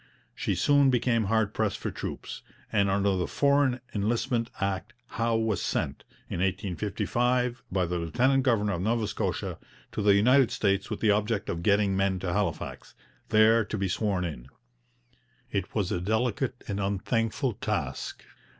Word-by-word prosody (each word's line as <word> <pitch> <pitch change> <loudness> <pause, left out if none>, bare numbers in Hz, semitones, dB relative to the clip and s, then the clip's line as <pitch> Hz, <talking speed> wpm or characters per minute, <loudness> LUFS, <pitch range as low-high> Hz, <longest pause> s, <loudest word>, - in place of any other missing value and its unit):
She - - -1
soon 145 -1 +4
became 120 -3 +2
hard 110 0 +1
pressed 110 -3 0
for - - -4
troops, - - -6 0.3
and 100 -1 +3
under 100 0 +2
the 90 -1 -1
Foreign 140 -3 +2
Enlistment 115 +2 0
Act 100 +3 -2 0.2
Howe 115 0 0
was 110 -5 0
sent, - - -2 0.2
in - - -4
1855, 115 +6 0
by 95 -1 +1
the 85 +1 -2
lieutenant 125 +11 +2
governor 110 -6 +2
of 85 - -2
Nova 110 +2 +1
Scotia - - -3 0.3
to - - -3
the 100 -1 +5
United 125 +5 +5
States 100 -2 0
with 110 - -4
the 110 - +4
object 105 0 0
of 85 - -2
getting 100 +1 +3
men 95 -1 +1
to - - -3
Halifax, - - -3 0.3
there 110 +1 +5
to 105 - -4
be 100 -1 0
sworn 95 -1 0
in. 70 -7 -6 1.0
It 100 -3 -3
was 100 -4 0
a 85 - -1
delicate 120 +5 -1
and 100 -1 -2
unthankful 115 +6 0
task. - - -3
105 Hz, 160 wpm, -28 LUFS, 95-120 Hz, 1.0 s, the